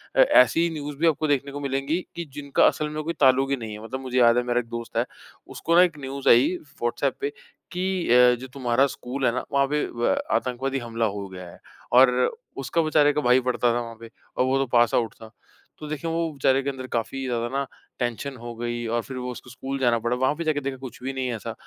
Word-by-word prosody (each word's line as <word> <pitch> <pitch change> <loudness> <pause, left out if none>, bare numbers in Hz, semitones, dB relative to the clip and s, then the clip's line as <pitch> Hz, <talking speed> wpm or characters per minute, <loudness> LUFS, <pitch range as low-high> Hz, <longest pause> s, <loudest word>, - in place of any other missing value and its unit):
अ, - - +1
ऐसी 145 +8 +5
न्यूज़ 150 -3 -6
भी 165 +3 +2
आपको 155 -1 +1
देखने 140 -1 0
को 145 - -6
मिलेंगी 140 +4 -1
कि 170 - -4
जिनका 140 -1 +2
असल 150 0 0
में 155 0 -4
कोई 165 - -2
ताल्लुक 135 0 +4
ही 140 - +2
नहीं 110 -3 -6
है। 105 +1 -9
मतलब 130 +4 -5
मुझे 130 -1 -4
याद 120 0 +5
है 125 - +2
मेरा 120 0 +1
एक 115 - -6
दोस्त 115 0 -6
है, - - +2 0.4
उसको 170 - -1
ना 175 - +8
एक 170 -4 0
न्यूज़ 135 0 -2
आई 130 +10 +5 0.3
व्हाट्सएप 120 0 0
पे 420 - 0 0.4
कि 185 0 -1
अ, 125 0 +6
जो 130 - -8
तुम्हारा 130 0 +1
स्कूल 130 +1 -4
है 120 - +4
ना, 130 - -3
वहाँ 140 0 +3
पे 150 +1 0
व 120 0 0
आतंकवादी 130 +2 -1
हमला 115 -2 -2
हो 100 -1 -3
गया 90 -1 -9
है। - - -14 0.4
और 130 0 +8 0.5
उसका 165 - 0
बेचारे 150 -2 +3
का 150 - 0
भाई 125 0 +4
पढ़ता 125 -1 +1
था 120 - 0
वहाँ 115 -1 -7
पे 115 0 -10 0.3
और 125 - +3
वो 130 +1 +2
तो 135 - +1
पास 120 -1 +4
आउट 115 -2 0
था। 110 -1 -13 0.5
तो 150 - -7
देखिए 155 +2 -4
वो 165 -1 -1
बेचारे 135 -1 +2
के 140 - -1
अंदर 130 -2 -6
काफ़ी 120 +4 -3
ज़्यादा 120 -2 -1
ना 140 - 0 0.3
टेंशन 125 +3 -3
हो 120 0 -7
गई 120 0 -3
और 120 +1 0
फिर 130 +2 -7
वो 125 0 -4
उसको 125 +1 -10
स्कूल 135 +2 -5
जाना 120 -3 +2
पड़ा। 120 +2 -1
वहाँ 130 +4 +1
पे 170 - -4
जाके 155 -2 +1
देखा 135 -1 -4
कुछ 130 -2 -10
भी 135 +1 -3
नहीं 130 -1 -2
है 120 - -2
ऐसा। 110 - -6
130 Hz, 250 wpm, -25 LUFS, 120-145 Hz, 0.5 s, ना